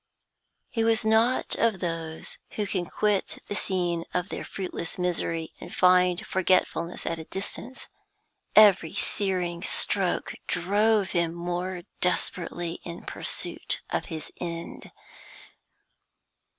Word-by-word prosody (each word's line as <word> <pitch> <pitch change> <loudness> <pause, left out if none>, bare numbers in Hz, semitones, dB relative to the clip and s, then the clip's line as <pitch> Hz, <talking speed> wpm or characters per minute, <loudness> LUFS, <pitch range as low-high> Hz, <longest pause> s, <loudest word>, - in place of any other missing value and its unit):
He 225 - +1
was 225 -1 +2
not 225 +3 +3
of 225 -4 +2
those 165 -2 -4 0.2
who 210 - 0
can 185 -3 -1
quit 210 -2 0
the - - -3
scene 175 -4 0
of 180 +1 0
their - - -4
fruitless 180 -3 -5
misery 165 -2 -1
and - - -8
find 180 -1 +5
forgetfulness 185 -2 +1
at 165 0 -1
a 160 - -7
distance. 210 +8 -6 0.7
Every 200 -6 +7
searing 180 -4 0
stroke 195 -1 0
drove 205 +2 +2
him 170 -2 +1
more 175 +1 -3 0.2
desperately 175 -1 -1
in 170 0 -7
pursuit - - -3
of - - 0
his 160 -4 -6
end. 170 -1 -5
180 Hz, 115 wpm, -27 LUFS, 170-200 Hz, 0.7 s, Every